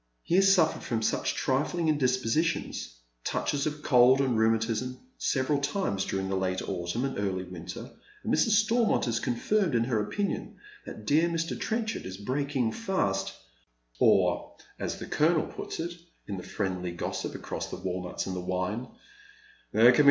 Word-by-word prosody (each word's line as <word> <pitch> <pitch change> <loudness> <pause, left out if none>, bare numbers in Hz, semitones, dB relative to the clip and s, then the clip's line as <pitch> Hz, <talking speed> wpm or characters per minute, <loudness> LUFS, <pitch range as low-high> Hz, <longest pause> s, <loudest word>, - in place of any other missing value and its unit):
He 170 - +1
ha« - - +7
suffered 195 -5 +4
from 115 -2 -2
such - - 0
trifling 150 +6 0
indispositions, 130 - 0 0.3
touches 145 0 0
of 150 0 -4
cold 125 0 +6
and 130 -3 +2
rheumatism, 115 +3 +1 0.2
several 140 +1 +1
times 145 - -1
during 95 0 -2
the 95 - -1
late 95 -1 -1
autumn 95 +7 -2
and 135 -6 -3
early 95 -2 -1
winter, 90 +5 -7 0.4
and - - 0
Mrs. 220 -1 +4
Stormont 225 - +2
is 115 -1 +1
confirmed 180 - +1
in 115 - +3
her 115 -3 +1
opinion 200 - -2 0.3
that 110 - -8
dear 160 +7 +4
Mr. 165 0 -1
Trenchard 225 - -2
is 95 0 -6
breaking 130 +2 -1
fast, 100 - -1 0.7
or, - - +3 0.2
as - - -3
the - - -6
colonel 160 +1 +2
puts - - -6
it, 170 +1 -3 0.3
in 100 - -4
the - - -5
friendly 90 -2 -3
gossip 85 - -4
across - - -5
the - - -5
walnuts 90 -1 -3
and 95 - -3
the - - -2
wine, 95 +7 -2 0.4
" 420 0 -27
there 115 +3 +7
can - - +1
bt. - - +3
125 Hz, 165 wpm, -29 LUFS, 100-160 Hz, 0.7 s, ha